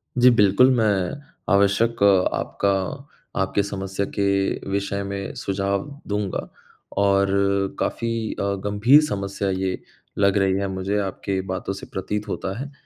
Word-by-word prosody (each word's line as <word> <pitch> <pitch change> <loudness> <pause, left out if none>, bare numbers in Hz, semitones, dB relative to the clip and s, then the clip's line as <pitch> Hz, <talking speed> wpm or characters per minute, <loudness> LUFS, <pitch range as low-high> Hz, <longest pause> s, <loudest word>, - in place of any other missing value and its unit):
जी, 125 0 +6
बिल्कुल, 105 +2 +5
मैं 105 +1 0 0.3
आवश्यक 100 +3 +2 0.3
आपका 100 - -1 0.7
आपकी 100 +1 +1
समस्या 95 0 -3
के 100 -1 0
विषय 100 0 -1
में 100 0 -5
सुझाव 100 +3 -1 0.2
दूँगा 105 -2 -2 0.5
और 100 0 +3 0.5
काफ़ी 115 0 -1 0.3
अ, - - 0 0.2
गंभीर 110 +9 +5
समस्या 100 -1 -2
ये 95 0 -1 0.4
लग 100 0 +3
रही 95 -1 +3
है 100 - -1
मुझे, 95 +2 -2
आपकी 95 0 -2
बातों 95 +1 -3
से 95 - -8
प्रतीत 105 +2 -3
होता 95 +1 -4
है। 140 - -3
अ, - - -15
100 Hz, 135 wpm, -23 LUFS, 95-105 Hz, 0.7 s, जी